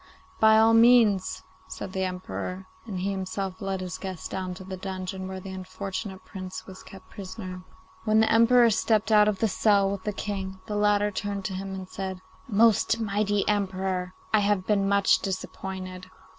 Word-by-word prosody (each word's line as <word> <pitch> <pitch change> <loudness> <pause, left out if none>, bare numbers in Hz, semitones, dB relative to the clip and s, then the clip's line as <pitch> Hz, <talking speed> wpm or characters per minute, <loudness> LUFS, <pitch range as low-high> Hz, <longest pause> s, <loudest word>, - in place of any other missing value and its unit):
'By 220 0 +6
all 225 +1 +6
means,' 225 -4 +5 0.2
said 185 - -7
the 190 0 0
Emperor; 185 0 -5 0.2
and 190 -4 -4
he 195 +2 0
himself 190 +1 -4
led 195 -1 -2
his 185 -1 -5
guest 190 -4 -6
down 185 -1 -3
to 190 - -9
the 190 0 -6
dungeon 185 0 -5
where 190 0 -5
the 190 +1 -8
unfortunate 190 +1 -6
Prince 185 -2 -7
was 185 -1 -11
kept 195 - -14
prisoner. 185 -2 -7 0.4
When 215 0 +3
the 220 - +3
Emperor 230 +1 +6
stepped 215 +1 +1
out 210 -1 +6
of 210 -2 +1
the 225 - +2
cell 200 -1 +3
with 200 -2 -5
the 210 - -1
King, 190 -2 -4
the 210 - -4
latter 205 0 +2
turned 200 -1 -4
to 190 - -2
him 195 +1 -5
and 190 -1 -7
said, 190 -1 -5 0.3
'Most 225 0 +3
mighty 205 -1 0
Emperor, 190 -2 -1 0.2
I 215 - +6
have 200 -2 +1
been 200 -2 +2
much 200 -1 +4
disappointed. 185 -1 -5
195 Hz, 180 wpm, -26 LUFS, 185-210 Hz, 0.4 s, By